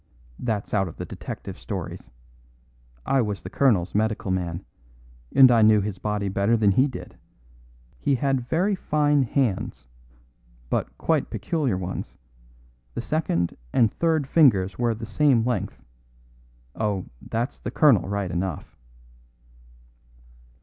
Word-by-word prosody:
"That's 110 -4 -3
out 95 -3 +2
of 85 - -9
the - - -5
detective - - -8
stories. - - -6 1.0
I 135 - +2
was 105 -6 -3
the 90 - -8
colonel's 105 -10 +2
medical 110 -2 0
man, 90 -1 -2 0.7
and 130 -2 +8
I 115 -2 +5
knew 110 0 +6
his 100 -2 -4
body 105 -1 -2
better 100 +4 +2
than 105 -2 +4
he 130 +8 +4
did. 130 - -9 0.8
He 140 - +1
had 135 0 0
very 185 +8 +1
fine 150 -5 +2
hands, 125 - -1 0.9
but - - -2
quite - - 0
peculiar 145 - -1
ones. 95 0 -5 0.8
The - - -2
second 115 - -1 0.2
and 115 -4 +3
third 160 -3 +1
fingers 120 - +3
were 120 -2 +1
the 115 +1 -7
same 120 0 +3
length. 125 -1 -3 0.9
Oh, 105 -4 -1 0.2
that's 120 +4 -2
the - - -5
colonel 115 - +4
right 100 -3 -2
enough." 90 -2 -4
110 Hz, 130 wpm, -24 LUFS, 95-135 Hz, 1.0 s, and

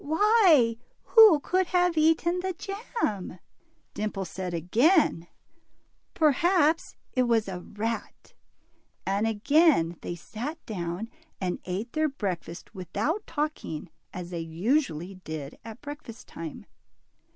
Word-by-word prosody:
Why, 320 - +4 0.4
who 435 -9 +9
could 370 +3 +1
have 355 -1 +2
eaten 325 +3 +3
the 375 +1 -2
jam? 390 - -4 0.3
" 325 0 -42
Dimple 205 -2 -3
said 180 +1 -5
again, 180 - +3 0.9
Perhaps 325 +1 +3 0.2
it 255 - +2
was 225 -3 +2
a 185 -2 -4
rat," 220 +5 -5 0.7
and 200 +3 +1
again 225 - +3
they 175 - -4
sat 240 - -6
down 180 0 -4 0.3
and 180 -2 -2
ate 195 +6 -4
their 310 0 +1
breakfast 185 -9 -5
without 285 - -2
talking, 290 - -4 0.2
as 180 -1 -7
they 170 - -3
usually 185 - -1
did 155 -2 -6
at 225 +1 -10
breakfast 290 -6 -9
time. 165 -2 -8
230 Hz, 120 wpm, -27 LUFS, -, 0.9 s, who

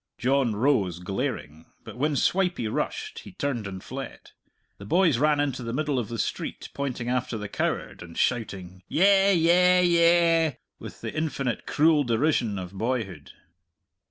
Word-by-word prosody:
John 130 -3 +1
rose, 105 - +1
glaring. 90 - -4 0.2
But - - -10
when 145 +4 0
Swipey 180 - +1
rushed 105 - -3
he - - -12
turned 125 -7 -3
and 95 -1 -8
fled. 135 +1 -8 0.5
The 100 - -9
boys 165 - +3
ran 150 0 +3
into 140 -3 -1
the 115 -1 -4
middle 145 -1 0
of 120 - -4
the 115 - -4
street, - - -4
pointing 130 -4 -4
after 125 -2 -1
the 105 -1 -5
coward - - -3
and 85 -1 -10
shouting, 95 -6 -2
"Yeh! 195 +3 +4
yeh! 180 +1 +4
yeh!" 170 -2 +4 0.3
with - - -10
the - - -5
infinite 140 -6 -2
cruel 155 -1 +3
derision 120 -3 +1
of 90 0 -7
boyhood. 100 - -3
130 Hz, 155 wpm, -26 LUFS, 105-160 Hz, 0.5 s, Yeh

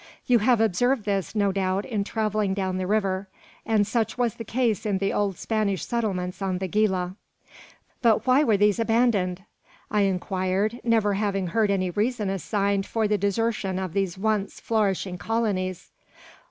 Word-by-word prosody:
You 245 -3 +4
have 240 +2 +3
observed 225 +3 +2
this, 195 -2 -1
no 200 -2 +2
doubt, 190 +1 -1
in 215 -5 -1
travelling 215 -2 -1
down 190 -2 -1
the 185 - -2
river; 195 -2 0 0.4
and 215 -2 +3
such 225 +2 -1
was 240 -3 +1
the 230 - -7
case 225 -2 0
in 205 -3 0
the 195 +1 -1
old 200 -3 0
Spanish 210 -4 -1
settlements 195 -6 -2
on 190 -2 -1
the 190 +1 -3
Gila." 190 -2 0 0.9
"But 230 -3 +3
why 260 +3 +5
were 220 -8 +3
these 205 +1 +3
abandoned?" 225 -6 +1 0.5
I 210 -1 +2
inquired, 195 +3 0
never 225 -3 +2
having 195 -2 -1
heard 215 +3 +2
any 185 -2 0
reason 210 0 -1
assigned 200 +1 -1
for 225 -2 0
the 210 -1 +1
desertion 200 -1 0
of 185 -3 -4
these 195 -2 -1
once 205 -1 -1
flourishing 195 -4 -1
colonies. 195 -5 -2
205 Hz, 165 wpm, -25 LUFS, 190-220 Hz, 0.9 s, why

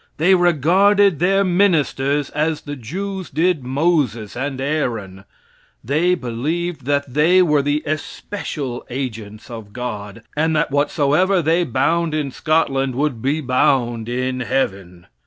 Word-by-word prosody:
They 175 +5 +4
regarded 180 +2 +4
their 195 +3 +3
ministers 150 -7 +1
as 155 +1 -1
the 145 0 -6
Jews 185 - -5
did 160 0 +1
Moses 130 - 0
and 135 +1 -3
Aaron. 115 -10 -3 0.6
They 160 +8 +2
believed 155 +4 -3
that 140 -2 -1
they 170 +6 +5
were 150 -4 +3
the 145 +2 -1
especial 150 -4 -5
agents 115 -4 -6
of 110 -3 -9
God, 110 -3 -6
and 160 +1 +1
that 155 -1 +1
whatsoever 150 +6 +2
they 165 +3 +2
bound 155 +5 0
in 145 -3 -2
Scotland 135 -4 0
would 135 -4 -1
be 145 +5 0
bound 120 -3 +1
in 130 +1 -2
heaven. 100 -8 -2
145 Hz, 130 wpm, -20 LUFS, 125-165 Hz, 0.6 s, they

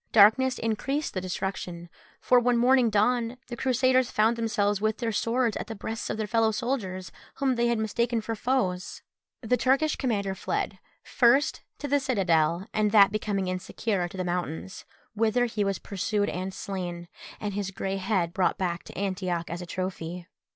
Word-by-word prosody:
Darkness 240 +5 +6
increased 270 +7 -2
the 185 - -2
destruction, 180 -2 -4 0.3
for 250 - +4
when 245 0 +2
morning 250 0 +4
dawned 230 +3 +1
the 240 - -4
Crusaders 255 0 +2
found 220 +2 +2
themselves 210 -3 0
with 215 0 +1
their 230 -2 -1
swords 230 +1 +1
at - - -5
the 225 - -6
breasts 220 +2 -5
of - - -2
their 215 - -1
fellow 225 +2 +2
soldiers, 210 -5 -3 0.2
whom 270 -2 +1
they 240 -1 +1
had 235 -1 +1
mistaken 235 +2 0
for 225 +1 -4
foes. 205 -6 -1 0.4
The 250 +1 +1
Turkish 275 +5 +2
commander 205 -7 -1
fled, - - -3 0.2
first 250 +4 +3 0.2
to 290 - -5
the 285 +1 +3
citadel, 185 - +1
and 215 -1 +2
that 200 -2 +7
becoming 205 -3 -1
insecure, 185 +1 -2
to 185 - -10
the 185 - -1
mountains, 175 0 -4 0.3
whither 225 +3 +2
he 220 -3 -1
was 195 -2 0
pursued 205 +2 -1
and 185 +1 -3
slain, 175 -3 -5 0.3
and 205 -1 -3
his 200 -1 -2
grey 195 0 -3
head 185 -3 0
brought 185 - +1
back 175 -2 -2
to - - -11
Antioch 185 -3 -2
as 170 +1 -4
a 180 - -7
trophy. 180 -1 -4
210 Hz, 175 wpm, -27 LUFS, 185-235 Hz, 0.4 s, that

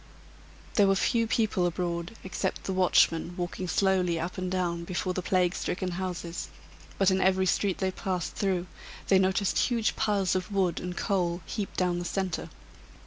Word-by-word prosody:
There 205 -2 +6
were 195 - +4
few 230 +3 +2
people 215 -6 +1
abroad, 175 +2 -3
except 190 0 -3
the 190 - -2
watchmen 175 -2 +3
walking 180 +1 -3
slowly 180 -3 +2
up 170 +3 -3
and 185 -2 -3
down 175 -2 -1
before 180 +1 -2
the 185 - -2
plague 180 -1 +2
stricken 180 0 -2
houses; 175 -2 -4 0.5
but 195 -1 +4
in 190 0 +2
every 190 0 +3
street 190 0 +1
they 190 -1 0
passed 185 -2 -3
through 185 -3 0 0.4
they 190 - +6
noticed 190 +1 +2
huge 230 -3 +1
piles 200 -4 +1
of 185 +2 -2
wood 190 -4 +1
and 180 0 -5
coal 180 -4 0
heaped 200 +3 -4
down 180 -1 +1
the 175 - -4
centre. 190 -1 -2
185 Hz, 170 wpm, -28 LUFS, 175-195 Hz, 0.5 s, There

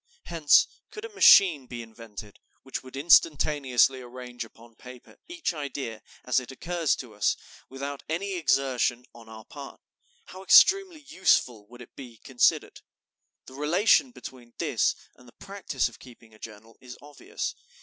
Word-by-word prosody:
Hence, 160 -4 +4 0.2
could 425 +1 -9
a - - -8
machine 165 - +6
be 120 -1 -7
invented 110 -2 -12 0.2
which 135 - -6
would 130 +1 -12
instantaneously 140 -4 +3
arrange 125 0 -9
upon 115 +1 -17
paper 125 +1 -15
each 340 - -4
idea 140 -7 -6 0.2
as 125 +1 +2
it 130 +1 -10
occurs 165 +2 -2
to 120 -4 -10
us, 105 0 0 0.3
without 140 +1 -7
any 195 +5 -3
exertion 135 -6 0
on 115 -1 -16
our 110 -1 -12
part, - - -11 0.5
how 185 - -12
extremely 370 - +5
useful 125 - 0
would 120 +2 -13
it - - -20
be 125 -4 -12
considered! 125 +2 0 0.6
The 130 - -14
relation 175 - +2
between 125 - -13
this - - 0 0.2
and 125 - -19
the 120 - -18
practice 195 -11 -3
of 120 - -14
keeping 115 -3 -17
a 110 - -20
journal 110 +1 -13
is 125 -1 -11
obvious.... 150 - -7
130 Hz, 150 wpm, -26 LUFS, 120-165 Hz, 0.6 s, machine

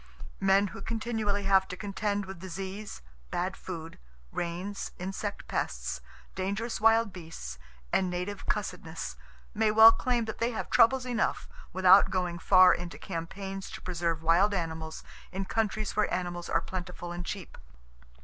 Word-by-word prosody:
Men 195 +1 +4
who - - -9
continually 220 -2 -1
have 195 -1 +4
to 180 - -6
contend 205 0 -2
with 190 -2 -8
disease, 190 - -6 0.3
bad 185 +2 -1
food, 165 -3 -7 0.3
rains, 180 +4 -3
insect 195 +2 -4
pests, - - -2 0.3
dangerous 200 +3 -2
wild 225 -2 +4
beasts 160 - -8 0.3
and 185 - +3
native 180 +3 -4
cussedness 165 - -3 0.4
may 220 0 +2
well 220 +1 +10
claim 240 0 0
that 220 - -6
they 230 - +2
have - - -4
troubles 255 +2 +5
enough, 240 -3 -1 0.2
without 190 +1 +7
going 180 -2 -1
far 185 +1 +7
into 175 -1 -5
campaigns 190 +3 -5
to - - -7
preserve 170 -3 -1
wild 185 +5 +4
animals 160 -2 -4 0.3
in 190 +1 -3
countries 215 0 -1
where 215 - +2
animals 175 -1 -3
are - - +2
plentiful 180 -2 -6
and 175 0 -4
cheap. 190 -4 -6
190 Hz, 145 wpm, -29 LUFS, 175-210 Hz, 0.4 s, well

